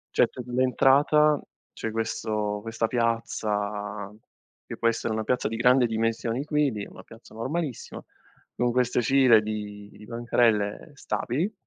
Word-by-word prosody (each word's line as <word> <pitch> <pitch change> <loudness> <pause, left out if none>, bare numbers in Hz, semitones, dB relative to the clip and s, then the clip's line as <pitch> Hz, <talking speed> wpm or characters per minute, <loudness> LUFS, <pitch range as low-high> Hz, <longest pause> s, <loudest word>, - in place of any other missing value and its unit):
C'è - - +4
t 125 - -8
l'entrata, 135 +4 +3 0.4
c'è 110 - -4
questo 110 -2 -2
questa 115 0 -2
piazza 105 -3 -2 0.6
che - - -8
può 115 - +1
essere 115 0 0
una 110 0 -2
piazza 125 -2 0
di 115 - -4
grande 125 +1 +4
dimensioni 115 +3 -1
qui, 150 -3 +1
di 105 -2 -5
una - - -13
piazza 115 0 -16
normalissima, 135 +3 -4 0.5
con 120 0 +1
queste 125 0 +1
cire 125 -2 +5
di 105 -1 -7
bancarelle 115 0 0
stabili, 145 - -2
115 Hz, 135 wpm, -26 LUFS, 110-125 Hz, 0.6 s, cire